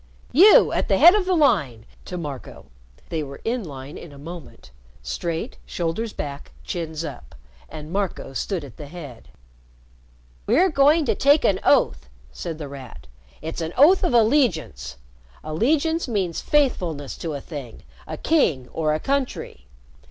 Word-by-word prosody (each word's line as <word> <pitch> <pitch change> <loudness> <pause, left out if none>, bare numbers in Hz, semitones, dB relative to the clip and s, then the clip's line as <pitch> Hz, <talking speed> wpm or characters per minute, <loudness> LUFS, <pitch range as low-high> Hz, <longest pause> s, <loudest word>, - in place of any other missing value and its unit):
You 385 - +7
at - - -1
the - - +2
head 345 - +9
of 415 -3 +1
the 370 - +2
line," 140 - +2 0.2
to 180 - -6
Marco. 145 -6 -7 0.4
They 160 -2 -2
were 140 -2 -8
in 235 0 -1
line 140 -3 -9
in 170 - -11
a 140 - -13
moment 165 - -11 0.3
straight, 160 - -4
shoulders 175 +7 -3
back, 140 -5 -7
chins 165 -2 -4
up. 65 - -9 0.3
And 155 +1 -9
Marco 195 -8 -3
stood 175 +5 -3
at 130 - -14
the 145 - -8
head. 145 -7 -10 1.2
"We're 330 - +4
going 295 +2 +4
to 225 - +2
take 285 +7 +4
an 190 -1 +2
oath," 65 -2 +2 0.2
said 155 - -6
The 150 -2 -6
Rat. 135 - -10 0.4
"It's 160 +2 -5
an 160 +1 -4
oath 330 +9 +6
of 310 -9 +1
allegiance. 190 - +1 0.5
Allegiance 290 - 0
means 190 -8 -1
faithfulness 180 - 0
to 160 -3 -4
a - - -4
thing 135 -5 -9 0.2
a - - -5
king 155 - +1
or 155 -2 0
a - - -2
country. 260 - -3
165 Hz, 155 wpm, -23 LUFS, -, 1.2 s, head